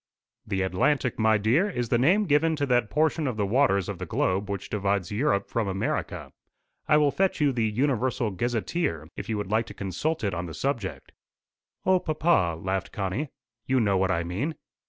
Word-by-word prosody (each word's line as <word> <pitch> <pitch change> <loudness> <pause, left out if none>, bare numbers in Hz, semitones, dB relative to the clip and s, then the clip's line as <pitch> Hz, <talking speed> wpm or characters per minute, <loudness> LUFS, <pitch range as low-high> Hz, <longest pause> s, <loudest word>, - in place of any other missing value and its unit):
"The 95 -1 0
Atlantic, 120 +8 +1
my 110 0 +4
dear, 125 - +2
is 120 - -3
the 120 - +2
name 185 +11 +4
given 160 0 +3
to 145 -2 0
that 120 -4 +2
portion 155 0 +1
of 125 -4 -2
the 105 - +1
waters 100 -4 +2
of - - -5
the - - -5
globe 95 +2 0
which 100 -2 -4
divides 100 -3 -1
Europe 105 -3 +1
from 115 -3 -1
America. 95 0 -3 0.6
I 150 - +5
will 150 -2 +4
fetch 190 +2 0
you 145 -2 +3
the 115 -3 0
Universal 125 -1 0
Gazetteer, 110 - -2
if - - -7
you 110 - 0
would 105 -1 -4
like 110 +1 +1
to - - -10
consult 130 - -2
it 100 -3 0
on 90 0 -3
the 80 - -7
subject." 120 - -3 0.7
"O 185 -1 +4
papa!" 155 - +1
laughed 95 +1 -2
Connie; 105 +8 -2 0.4
"you 130 0 +3
know 100 -4 +2
what 95 0 +2
I 85 -2 +1
mean." 110 - -3
115 Hz, 195 wpm, -26 LUFS, 100-145 Hz, 0.7 s, I